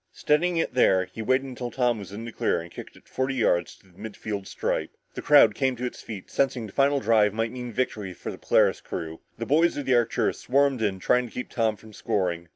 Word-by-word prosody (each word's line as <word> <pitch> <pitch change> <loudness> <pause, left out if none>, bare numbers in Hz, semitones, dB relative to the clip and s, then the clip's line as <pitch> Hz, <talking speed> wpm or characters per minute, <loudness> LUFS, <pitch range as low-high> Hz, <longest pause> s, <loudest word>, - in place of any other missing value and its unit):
Steadying 170 +4 +1
it 165 - -1
there, 95 -7 +4
he 95 +5 -9
waited 130 +4 +1
until 125 -2 -5
Tom 120 -3 0
was 100 -1 -9
in 110 +3 -7
the 115 - -6
clear - - 0
and 85 +1 -9
kicked - - -10
it - - -20
forty 130 +1 -2
yards 90 -8 +1
to - - -25
the 90 -1 -22
mid 110 -2 -8
field 100 -3 -5
stripe. - - -2 0.2
The - - -6
crowd 145 -8 +6
came 130 +1 0
to 125 +1 -4
its 125 - -6
feet, 105 -4 -8
sensing 130 -4 0
this 100 - -11
final 140 0 +3
drive 110 -4 +3
might 115 0 -1
mean 125 -1 -6
victory 105 -6 -3
for - - -6
the - - -10
Polaris - - +2
crew. 80 -1 -6 0.2
The 115 - -4
boys 160 +6 +3
of 145 - -3
the 130 - +2
Arcturus 120 -2 +1
swarmed 135 -1 +2
in 100 -3 0
trying 125 +6 +1
to - - -15
keep 125 - -5
Tom 110 -2 +1
from 110 +1 -16
scoring. 85 -5 -2
115 Hz, 245 wpm, -26 LUFS, 105-130 Hz, 0.2 s, crowd